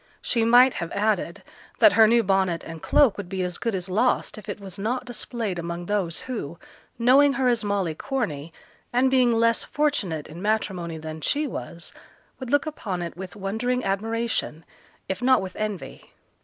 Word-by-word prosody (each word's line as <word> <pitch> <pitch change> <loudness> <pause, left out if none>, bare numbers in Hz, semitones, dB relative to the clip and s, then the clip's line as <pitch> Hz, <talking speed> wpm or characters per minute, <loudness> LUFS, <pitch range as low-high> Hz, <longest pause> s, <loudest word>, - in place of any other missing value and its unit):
She 230 -2 0
might 245 +3 +6
have 170 - -4
added, 205 -5 -1 0.3
that - - +6
her 220 -1 +7
new 235 +1 +4
bonnet 190 -4 +1
and 165 -1 -8
cloak 275 -8 +4
would 200 -3 -6
be 190 -1 -2
as 180 -1 -3
good 230 -3 -1
as 180 -1 -3
lost 220 +7 +1
if 215 - -10
it - - -4
was 195 -1 -8
not 245 +5 -2
displayed 235 -6 -4
among 170 +1 -5
those 190 -4 -1
who, 215 - -5 0.4
knowing 270 +4 +5
her 265 -2 +1
as 235 -2 +2
Molly 200 -5 0
Corney, 165 - -3 0.4
and 255 +2 +3
being 255 -2 +4
less 230 0 +2
fortunate 215 - -1
in 165 +3 -10
matrimony 190 -6 -1
than 155 0 -7
she 295 - 0
was, 170 - -6 0.5
would 260 -2 -6
look 290 +2 +2
upon 200 - -4
it 170 - -6
with 180 +1 -8
wondering 225 +6 -1
admiration, 215 -4 -2 0.4
if 190 - -3
not 260 +1 +5
with 190 -1 -6
envy. 210 -3 -5
210 Hz, 180 wpm, -25 LUFS, 180-245 Hz, 0.5 s, her